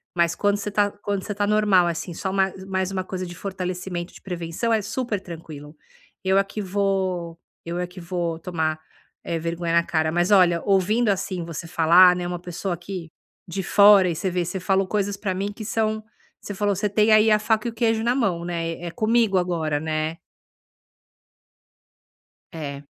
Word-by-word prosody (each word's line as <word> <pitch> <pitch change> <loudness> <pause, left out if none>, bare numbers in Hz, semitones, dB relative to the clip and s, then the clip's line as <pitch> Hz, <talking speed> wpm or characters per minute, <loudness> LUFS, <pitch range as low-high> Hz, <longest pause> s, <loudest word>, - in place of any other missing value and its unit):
mas 170 -1 +2
quando 205 0 +1
você 205 0 -4
tá 205 0 +2
quando 200 -2 -2
você 205 - -5
tá 205 0 0
normal, 205 -4 +4
assim, 170 +1 -3
só 190 - -3
ma 195 -1 +2
só 190 0 -11
mais 190 -1 -1
uma 185 -1 -2
coisa 185 0 -5
de 175 - -9
fortalecimento 180 -2 -4
de - - -14
prevenção, 180 +5 -2
é 220 - +2
super 215 -1 -3
tranquilo. 155 -3 -10 0.5
Eu 190 +1 +3
aqui 195 +2 -2
vou 185 -3 -1 0.2
eu 170 +1 -4
aqui 180 +1 -5
vou 170 -1 -3
tomar, 160 -2 -2 0.4
eh, 165 - -2
vergonha 170 +1 -2
na 170 - +4
cara, 155 -2 0
mas 175 +4 +1
olha 175 -4 +5
ouvindo, 205 +4 +2
assim, 185 -2 -1
você 165 0 -6
falar, 175 +2 +6
né, 180 - -3
uma 175 0 -4
pessoa 175 +1 -4
que 175 -2 -7 0.4
de 190 +2 -3
fora 200 -1 +6
e 165 - -2
você 185 +3 -2
vê 180 0 0
você 185 +2 -4
falou 190 +1 +1
coisas 205 -1 -1
pra 195 -1 -3
mim 200 +2 -3
que 215 - -8
são 220 0 -1 0.4
você 205 - -6
falou: 205 0 0
"Você 205 +3 0
tem 210 +2 +3
aí, 215 0 +6
a 210 - +5
faca 215 +1 0
e 235 - -2
o - - -15
queijo 225 -1 +1
na 240 +1 +2
mão". 180 -9 0
Né? 165 -1 -2
É 170 - -4
comigo 220 -1 +2
agora, 160 -4 -1
né. 155 +1 -2 2.3
É. 145 -3 -6
185 Hz, 190 wpm, -23 LUFS, 170-205 Hz, 2.3 s, falar